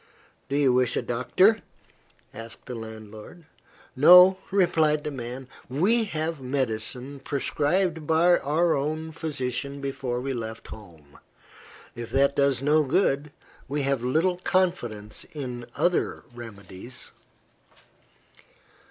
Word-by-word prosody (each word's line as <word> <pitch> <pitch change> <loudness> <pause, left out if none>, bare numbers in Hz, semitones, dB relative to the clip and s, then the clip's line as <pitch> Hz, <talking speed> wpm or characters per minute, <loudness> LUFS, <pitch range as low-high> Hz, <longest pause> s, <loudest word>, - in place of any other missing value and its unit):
"Do 140 - 0
you 135 -3 +4
wish 125 -1 +1
a - - -1
doctor?" 185 - +2 0.7
asked 115 +1 -9
the 125 - -6
landlord. 110 +6 -10 0.5
"No," 180 +6 +8
replied 160 -6 +2
the 150 - -3
man. 125 0 -7 0.2
"We 205 - +2
have 160 -5 -3
medicine, 130 +1 -3
prescribed 155 +4 -1
by 170 +2 +4
our 160 +4 +1
own 155 +3 -3
physician 140 -4 -3
before 135 -3 -3
we 135 +2 -3
left 115 -2 -6
home. 80 -9 -13 0.7
If 120 -1 -7
that 140 +1 +2
does 140 -2 +2
no 150 +2 +4
good, 145 -1 +1 0.4
we 145 +1 -2
have 135 -2 0
little 165 +8 +1
confidence 120 - -1
in 125 -5 -5
any - - -27
other 175 +5 0
remedies." 115 0 -8
140 Hz, 115 wpm, -26 LUFS, 120-160 Hz, 0.7 s, No